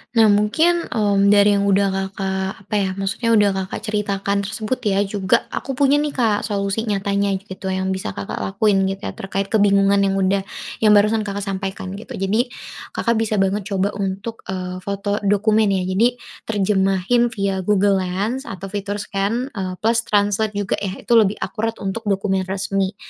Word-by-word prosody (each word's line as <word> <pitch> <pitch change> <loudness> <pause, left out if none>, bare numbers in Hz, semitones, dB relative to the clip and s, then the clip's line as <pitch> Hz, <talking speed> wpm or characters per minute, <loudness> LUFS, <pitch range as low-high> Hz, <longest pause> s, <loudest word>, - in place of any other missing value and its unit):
Nah 220 -2 +6
mungkin, 320 +13 +2
mmm, 200 -3 +2
dari 205 0 +6
yang 200 - +1
udah 200 0 +3
Kakak, 190 0 -3
apa 205 - -10
ya 195 - 0
maksudnya 195 +4 -2
udah 205 -1 +5
Kakak 190 +2 -4
ceritakan 200 -1 -1
tersebut 215 +4 -3
ya 200 0 +2
juga 200 +2 +1
aku 270 - -4
punya 280 +2 +3
nih 295 -1 -2
Kak 225 -5 +1
solusi 200 +2 -2
nyatanya 200 -1 0
gitu 190 -1 -8
yang 190 0 -1
bisa 190 - -4
Kakak 100 -1 -5
lakuin 195 0 +1
gitu 195 +1 -4
ya - - -3
terkait 195 0 -4
kebingungan 200 -2 +4
yang 195 -1 +2
udah 195 0 +1 0.3
yang 210 -1 +5
barusan 215 +1 +3
Kakak 200 0 -3
sampaikan 190 -1 -4
gitu. - - -8
Jadi, 215 +6 0 0.5
Kakak 235 -1 +1
bisa 220 -1 0
banget 195 +1 0
coba 200 0 0
untuk, 200 +3 -4
eee, 185 -1 -4
foto 200 +2 -2
dokumen 210 +1 +3
ya. 190 -2 +1
Jadi 215 +7 +2 0.3
terjemahin 195 +2 +2
via 200 -5 -2
Google 200 0 +2
Lens 205 +9 -2
atau 195 0 -7
fitur 205 0 -3
scan, 210 +6 -2
eee, 190 -4 -4
plus 230 +1 +2
translate 205 +1 +1
juga 205 -1 -1
ya, 195 -1 -3
itu 240 - -7
lebih 210 -1 +2
akurat 225 0 -2
untuk 210 +3 -4
dokumen 195 -1 0
resmi. 195 0 -1
200 Hz, 175 wpm, -20 LUFS, 195-215 Hz, 0.5 s, Nah